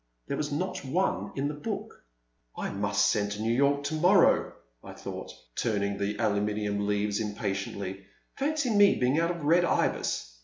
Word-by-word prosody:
There - - -3
was 150 -1 -2
not 185 +5 -2
one 175 +9 -1
in 140 +1 0
the 150 - -3
book. 150 - -6 0.5
I - - -3
must - - +1
send 105 -1 0
to 105 - -6
New 115 +1 +1
York 140 +3 +2
to 145 +2 -2
morrow, 175 +4 +4 0.3
I - - -9
thought, - - -7 0.2
turning 100 -3 -1
the 100 +1 -1
aluminum 105 0 0
leaves 105 0 0
impa 105 -1 -2
tiently; 95 0 -5 0.3
fancy 285 -2 0
my 205 -1 +5
being 130 +5 +2
out 170 0 +1
of 170 -3 -4
Red 170 +4 +4
Ibis! - - -1
125 Hz, 175 wpm, -28 LUFS, 100-165 Hz, 0.5 s, my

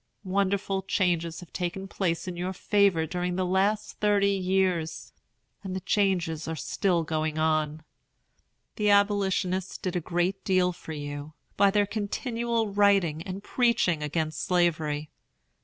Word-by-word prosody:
Wonderful 195 0 0
changes 175 -4 0
have 175 - -14
taken 185 +2 -3
place 180 -3 -2
in 180 - -4
your 180 +2 -3
favor 195 -4 +2
during 180 +2 -2
the 185 0 0
last 195 +4 0
thirty 205 -1 +3
years, 185 -4 0 0.5
and 190 -2 -5
the - - -1
changes 180 -5 0
are 160 - -2
still 170 +3 0
going 155 0 -2
on. 155 -1 0 0.9
The 210 -2 +2
Abolitionists 195 -2 +2
did 185 -2 -4
a - - +2
great 175 +4 -1
deal 185 -2 +2
for 160 - -9
you, 145 0 -6 0.2
by 200 - +5
their 205 +1 +2
continual 230 +1 -2
writing 195 -6 +3
and 190 +2 -5
preaching 235 -11 +2
against 155 +1 -2
Slavery. 155 -5 0
185 Hz, 140 wpm, -27 LUFS, 165-200 Hz, 0.9 s, by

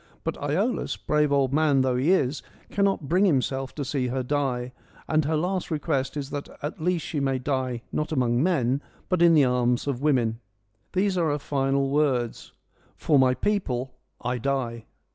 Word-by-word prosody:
But - - -1
Iolaus, 180 - -1
brave 150 -1 +1
old 140 -2 +2
man 145 -3 +3
though 130 -1 +1
he 130 +6 +1
is, 150 -7 +2 0.3
cannot 195 -7 +1
bring 180 +6 +3
himself 135 -5 0
to 145 - -3
see 130 -2 -1
her 130 +1 -2
die, 125 -2 -1 0.4
and 155 -1 +2
her 155 +2 +1
last 180 +3 -1
request 150 -3 -1
is 140 -1 -5
that 145 0 -5
at 150 +1 -5
least 175 0 0
she 150 - -3
may 135 -1 +1
die 130 -2 -2
not 150 - -2
among 125 -4 +1
men, 140 -6 +1 0.3
but 180 -2 +1
in 170 -1 +6
the 145 -3 +6
arms 125 -1 +1
of 140 -3 -2
women. 120 -6 +1 0.5
These 190 0 +1
are 165 -2 +2
her 145 - 0
final 135 -1 0
words: 135 -5 0 0.2
' - - -35
For 145 -3 +2
my 130 -1 +4
people 130 -12 -1 0.3
I 125 +1 -2
die. 120 -3 -2
140 Hz, 180 wpm, -26 LUFS, 130-155 Hz, 0.5 s, in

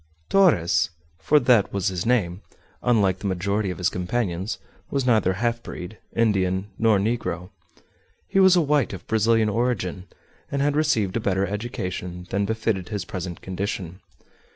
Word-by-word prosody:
_ - - -42
Torres 85 - +4 0.3
for 150 - +4
that 120 -6 +4
was 100 0 0
his 90 +3 -3
name 100 -7 +1 0.4
unlike 100 -6 +2
the 100 - -3
majority 100 +2 -1
of 90 - -4
his 90 - +1
companions, 90 +1 -2 0.3
was 135 -2 -1
neither 110 -6 +3
half 115 +4 -1
breed, 95 +1 -8 0.2
Indian, 95 -3 +1
nor 110 -2 +4
negro. 95 -4 -2 0.8
He 195 - +1
was 190 -1 +7
a 175 - +5
white 145 -6 +1
of 95 - -8
Brazilian 110 0 +3
origin, 105 -5 -1 0.4
and 140 - -1
had 145 +1 +1
received 115 -11 +1
a - - 0
better 100 -2 +1
education 90 -4 -4
than 100 +1 +1
befitted 110 -3 -1
his 100 -3 -3
present 90 -5 -6
condition. 95 -1 -4
100 Hz, 155 wpm, -24 LUFS, 95-115 Hz, 0.8 s, was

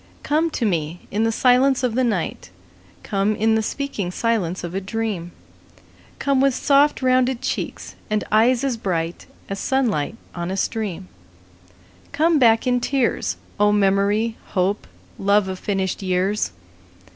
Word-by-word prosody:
Come 315 +3 +1
to 235 - 0
me 165 -3 -1
in 215 +2 +1
the 225 - +2
silence 255 +2 +3
of 245 -3 +1
the 260 +2 +1
night; 200 - -2 0.5
Come 200 +2 0
in 220 +1 +2
the 220 - +2
speaking 220 -5 -3
silence 190 -4 -1
of 175 0 -5
a 195 - -2
dream; 195 -4 -3 0.9
Come 275 -2 +1
with 275 -2 +3
soft 285 0 +3
rounded 255 -1 +2
cheeks - - -4 0.2
and 215 0 0
eyes 235 +4 +4
as 265 -4 0
bright 170 -5 -3 0.2
As 195 0 -4
sunlight 235 - 0 0.2
on 175 0 -4
a 190 - -3
stream; 195 -4 -2 1.1
Come 320 +1 +3
back 225 -2 +4
in 250 -1 +2
tears, 260 0 0 0.2
O 210 0 +4
memory, 205 +3 +2 0.2
hope, 190 +3 0 0.3
love 200 0 +3
of 185 -1 -5
finished 195 -2 -2
years. 190 - 0
215 Hz, 145 wpm, -22 LUFS, 190-250 Hz, 1.1 s, eyes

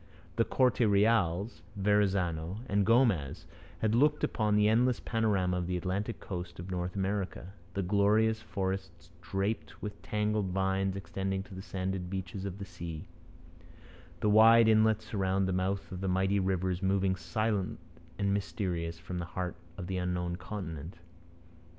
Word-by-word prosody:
The 115 - +3
Corte 130 -2 +2
Reals, 105 -3 +2
Verrazano, 95 -3 +1
and 100 -2 +1
Gomez 115 - +2 0.4
had 110 -1 +2
looked 150 +5 +3
upon 105 -2 +1
the 105 0 +4
endless 120 +3 +3
panorama 100 -6 +1
of 90 -1 -2
the 90 0 -1
Atlantic 100 +5 -2
coast 90 -2 -6
of 90 +2 -6
North 90 0 -3
America 95 -1 -2 0.2
the 100 - 0
glorious 105 +3 +3
forests 95 -3 -4
draped 100 +3 -3
with 105 -1 -6
tangled 105 -1 0
vines 95 +1 0
extending 95 +1 -3
to 100 0 -13
the 95 - -6
sanded 95 -1 -3
beaches 95 0 -4
of 95 -1 -5
the 100 - -6
sea 85 -3 -7 1.2
the 105 - +3
wide 115 +2 +7
inlets 110 0 +3
round 95 -1 +1
the 95 - 0
mouths 95 +2 -1
of 90 0 -5
mighty 95 +2 +2
rivers 95 -1 0
moving 95 -1 +2
silent 95 +3 -1 0.4
and 100 -1 +1
mysterious 90 -4 -2
from 90 +1 -6
the 85 - -3
heart 90 +1 -4 0.2
of 95 - -5
the 95 +1 -3
unknown 90 -1 -1
continent. 90 -4 -6
95 Hz, 150 wpm, -31 LUFS, 90-105 Hz, 1.2 s, wide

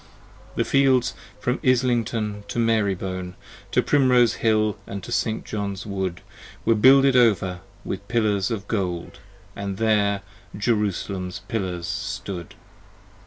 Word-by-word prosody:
The - - +1
fields 130 -3 +3 0.3
from 125 +4 -1
Islington 115 -5 +1
to 100 - -6
Marybone, 95 -5 0 0.4
To - - +3
Primrose 125 -4 +4
Hill 110 -2 +2
and 100 -1 -6
Saint 115 -2 -1
John's 100 -2 -4
Wood, 95 -4 -3 0.4
20 - - -28
Were 115 - +5
builded 135 +4 +6
over 95 -7 +3 0.3
with 100 +1 -5
pillars 105 -4 +1
of 105 -4 -4
gold, 90 -5 -3 0.4
And 100 -1 -4
there 100 -2 +2 0.3
Jerusalem's 100 -3 -1
pillars 90 -6 -3
stood. 95 -2 -5
105 Hz, 120 wpm, -24 LUFS, 95-115 Hz, 0.4 s, builded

